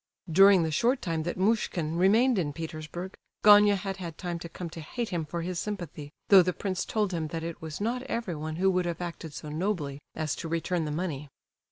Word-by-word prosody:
During 195 Hz, +1 st, +7 dB
the 160 Hz, -, -1 dB
short 245 Hz, -, +2 dB
time 165 Hz, -3 st, -2 dB
that 175 Hz, +3 st, -3 dB
Muishkin 185 Hz, -6 st, 0 dB
remained 215 Hz, +6 st, +4 dB
in 145 Hz, -5 st, -1 dB
Petersburg 165 Hz, +3 st, -6 dB, 0.3 s
Gania 205 Hz, 0 st, +8 dB
had 195 Hz, 0 st, -4 dB
had 170 Hz, -4 st, -7 dB
time 175 Hz, -2 st, -4 dB
to 170 Hz, -, -7 dB
come 175 Hz, +1 st, -6 dB
to 165 Hz, -, -7 dB
hate 230 Hz, +9 st, -4 dB
him 170 Hz, -4 st, -2 dB
for 170 Hz, +2 st, -4 dB
his 180 Hz, 0 st, -3 dB
sympathy, 170 Hz, -8 st, -5 dB, 0.2 s
though 195 Hz, -2 st, +9 dB
the 180 Hz, 0 st, 0 dB
prince 190 Hz, -1 st, -3 dB
told 210 Hz, -4 st, 0 dB
him 160 Hz, -2 st, -1 dB
that 165 Hz, 0 st, -5 dB
it 165 Hz, 0 st, -6 dB
was 160 Hz, -2 st, -6 dB
"not 235 Hz, +4 st, -1 dB
everyone 155 Hz, -9 st, -3 dB
who 190 Hz, +3 st, +3 dB
would 180 Hz, -1 st, +1 dB
have 170 Hz, -1 st, -3 dB
acted 170 Hz, -2 st, -6 dB
so 150 Hz, +2 st, -8 dB
nobly" 155 Hz, -4 st, -2 dB, 0.2 s
as 155 Hz, -2 st, -2 dB
to -, -, -5 dB
return 165 Hz, 0 st, -1 dB
the 150 Hz, -, -3 dB
money. 150 Hz, -3 st, -3 dB
175 Hz, 215 wpm, -28 LUFS, 160-195 Hz, 0.3 s, though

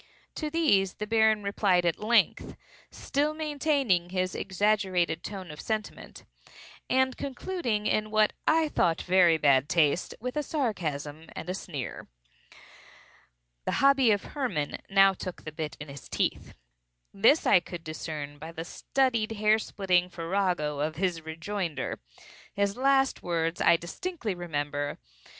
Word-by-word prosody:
To 305 Hz, -, -3 dB
these 290 Hz, -, +2 dB
the 210 Hz, -, -4 dB
Baron 220 Hz, -1 st, +3 dB
replied 200 Hz, -3 st, +2 dB
at 170 Hz, -, +1 dB
length 230 Hz, +2 st, +2 dB, 0.3 s
(still 295 Hz, +2 st, -1 dB
maintaining 285 Hz, -, 0 dB
his 185 Hz, -1 st, -1 dB
exaggerated 190 Hz, -4 st, 0 dB
tone 190 Hz, -5 st, -7 dB
of 150 Hz, -, -9 dB
sentiment) 215 Hz, -2 st, -5 dB, 0.6 s
and 260 Hz, 0 st, +2 dB
concluding, 260 Hz, -, -3 dB
in 215 Hz, 0 st, +1 dB
what 215 Hz, 0 st, +3 dB
I 320 Hz, 0 st, +4 dB
thought 170 Hz, -, +1 dB
very 180 Hz, -3 st, +5 dB
bad 140 Hz, -2 st, +3 dB
taste, 160 Hz, +1 st, +2 dB
with 250 Hz, +4 st, -5 dB
a 300 Hz, -, +1 dB
sarcasm 160 Hz, -, -3 dB
and 180 Hz, -, -5 dB
a -, -, -2 dB
sneer. 150 Hz, -8 st, -6 dB, 1.6 s
The -, -, -1 dB
hobby 275 Hz, -2 st, +4 dB
of 205 Hz, -2 st, +2 dB
Hermann 240 Hz, -, -3 dB
now 195 Hz, 0 st, +6 dB
took 185 Hz, -1 st, -7 dB
the 155 Hz, -, -6 dB
bit 155 Hz, -1 st, -5 dB
in 145 Hz, -, -7 dB
his 140 Hz, -2 st, -11 dB
teeth. -, -, -2 dB, 0.6 s
This 230 Hz, +10 st, +4 dB
I -, -, +6 dB
could 175 Hz, -1 st, -9 dB
discern 150 Hz, -2 st, -6 dB
by 160 Hz, +2 st, -8 dB
the 165 Hz, 0 st, -6 dB
studied 235 Hz, +1 st, 0 dB
hair 215 Hz, +1 st, +3 dB
splitting 180 Hz, -4 st, 0 dB
farrago 170 Hz, -4 st, -1 dB
of 155 Hz, +2 st, -1 dB
his 175 Hz, -1 st, -1 dB
rejoinder. 160 Hz, -2 st, -4 dB, 0.6 s
His 200 Hz, 0 st, 0 dB
last 270 Hz, +1 st, +2 dB
words 165 Hz, -1 st, -1 dB
I 170 Hz, -, +5 dB
distinctly 230 Hz, -, -4 dB
remember. 145 Hz, -4 st, -3 dB
190 Hz, 140 wpm, -28 LUFS, 165-225 Hz, 1.6 s, now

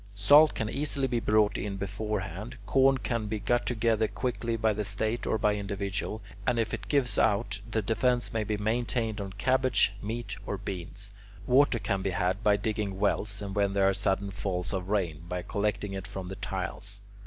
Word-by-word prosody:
Salt 145 Hz, +10 st, +6 dB
can 110 Hz, -, -1 dB
easily 140 Hz, +3 st, -1 dB
be 120 Hz, -2 st, 0 dB
brought 105 Hz, -2 st, +2 dB
in 100 Hz, -2 st, -3 dB
beforehand; 100 Hz, +1 st, -4 dB
corn 135 Hz, +3 st, +4 dB
can 115 Hz, -4 st, -2 dB
be 110 Hz, +1 st, -2 dB
got 120 Hz, +4 st, 0 dB
together 110 Hz, -2 st, +2 dB
quickly 120 Hz, -2 st, -2 dB
by 110 Hz, -1 st, +2 dB
the 105 Hz, +1 st, -2 dB
State 110 Hz, +4 st, -1 dB
or -, -, +2 dB
by 105 Hz, 0 st, +2 dB
individuals, 100 Hz, +1 st, -3 dB, 0.3 s
and 125 Hz, -, +2 dB
if 115 Hz, -1 st, 0 dB
it 105 Hz, -4 st, -4 dB
gives 140 Hz, -4 st, +2 dB
out, 105 Hz, 0 st, +2 dB
the 110 Hz, -1 st, 0 dB
defence 120 Hz, +3 st, +1 dB
may 110 Hz, -1 st, 0 dB
be 105 Hz, 0 st, -2 dB
maintained 110 Hz, 0 st, -1 dB
on 100 Hz, -1 st, -5 dB
cabbage, 130 Hz, -1 st, +3 dB
meat, 115 Hz, +3 st, -4 dB
or -, -, -2 dB
beans; 95 Hz, +2 st, -5 dB, 0.3 s
water 130 Hz, 0 st, +4 dB
can 100 Hz, -3 st, -1 dB
be 95 Hz, -, 0 dB
had 90 Hz, +3 st, 0 dB
by 105 Hz, -1 st, +4 dB
digging 105 Hz, -2 st, -2 dB
wells, 100 Hz, 0 st, +1 dB
or 100 Hz, -, -4 dB
when 100 Hz, 0 st, +1 dB
there 100 Hz, -1 st, +3 dB
are 95 Hz, -, +3 dB
sudden 95 Hz, +1 st, 0 dB
falls 95 Hz, 0 st, -3 dB
of 95 Hz, -1 st, -3 dB
rain, 90 Hz, -7 st, 0 dB
by 90 Hz, 0 st, -3 dB
collecting 105 Hz, -1 st, -1 dB
it 95 Hz, 0 st, -5 dB
from 95 Hz, -2 st, -6 dB
the 95 Hz, -, -5 dB
tiles. 95 Hz, +2 st, -5 dB
105 Hz, 190 wpm, -29 LUFS, 100-115 Hz, 0.3 s, Salt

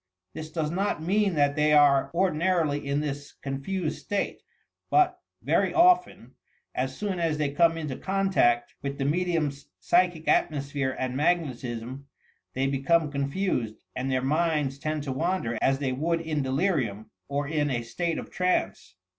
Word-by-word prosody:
This 155 Hz, 0 st, -7 dB
does 155 Hz, -1 st, -2 dB
not 185 Hz, -3 st, -1 dB
mean 195 Hz, +1 st, +1 dB
that 145 Hz, -1 st, +2 dB
they 150 Hz, 0 st, +3 dB
are 145 Hz, -2 st, +5 dB
ordinarily 170 Hz, -5 st, +1 dB
in 140 Hz, +1 st, 0 dB
this 145 Hz, -1 st, -5 dB
confused 150 Hz, +5 st, -4 dB
state, 205 Hz, -, -2 dB, 0.5 s
but 365 Hz, -1 st, +3 dB, 0.2 s
(very -, -, +1 dB
often) 360 Hz, +1 st, +3 dB, 0.4 s
as 130 Hz, +1 st, -2 dB
soon 200 Hz, -4 st, -2 dB
as 165 Hz, -3 st, 0 dB
they 150 Hz, -2 st, 0 dB
come 165 Hz, +3 st, +3 dB
into 150 Hz, -5 st, -4 dB
contact 190 Hz, -12 st, +1 dB
with 140 Hz, 0 st, -4 dB
the 135 Hz, -, -1 dB
medium's 155 Hz, -3 st, -1 dB
psychic 175 Hz, -2 st, +2 dB
atmosphere 140 Hz, -3 st, 0 dB
and 130 Hz, -1 st, -2 dB
magnetism, 135 Hz, -5 st, -2 dB, 0.5 s
they 135 Hz, +1 st, +1 dB
become 145 Hz, +3 st, +1 dB
confused 140 Hz, -, -1 dB, 0.2 s
and 130 Hz, +1 st, -2 dB
their 130 Hz, -1 st, 0 dB
minds 150 Hz, -2 st, 0 dB
tend 155 Hz, 0 st, -2 dB
to 140 Hz, -, -3 dB
wander 145 Hz, -4 st, -1 dB
as 135 Hz, 0 st, +3 dB
they 135 Hz, -2 st, -1 dB
would 165 Hz, +6 st, 0 dB
in 155 Hz, -3 st, -2 dB
delirium 130 Hz, -, -1 dB, 0.2 s
or 140 Hz, 0 st, -2 dB
in 150 Hz, -1 st, 0 dB
a 120 Hz, -3 st, -1 dB
state 170 Hz, +8 st, -2 dB
of -, -, -7 dB
trance. 180 Hz, -, -1 dB
150 Hz, 155 wpm, -27 LUFS, 135-170 Hz, 0.5 s, are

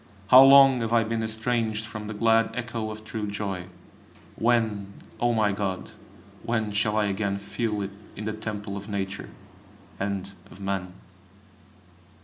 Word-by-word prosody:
How 130 Hz, +1 st, +10 dB
long 135 Hz, -2 st, +8 dB
have 115 Hz, 0 st, -2 dB
I 115 Hz, -1 st, +4 dB
been 115 Hz, +1 st, -2 dB
estranged 110 Hz, 0 st, -1 dB
from 110 Hz, -2 st, -7 dB
the 110 Hz, -, -5 dB
glad 115 Hz, +1 st, +3 dB
echo 115 Hz, -2 st, -3 dB
of 110 Hz, 0 st, -8 dB
true 110 Hz, -1 st, -4 dB
joy! 100 Hz, -3 st, -4 dB, 0.7 s
When! 110 Hz, -4 st, +1 dB, 0.3 s
O 120 Hz, 0 st, +2 dB
my 110 Hz, -3 st, +2 dB
God! 95 Hz, -2 st, -3 dB, 0.5 s
when 110 Hz, -3 st, -1 dB
shall 105 Hz, +1 st, +1 dB
I 105 Hz, -, +3 dB
again 100 Hz, 0 st, -1 dB
feel 105 Hz, +2 st, -3 dB
it 100 Hz, -, -5 dB, 0.2 s
in 105 Hz, -, -6 dB
the 110 Hz, -, -2 dB
temple 105 Hz, -2 st, -5 dB
of 100 Hz, +1 st, -7 dB
Nature 95 Hz, -2 st, -4 dB, 0.7 s
and 100 Hz, -1 st, -3 dB, 0.2 s
of -, -, -14 dB
man? 95 Hz, -2 st, -3 dB
110 Hz, 150 wpm, -26 LUFS, 100-115 Hz, 0.7 s, How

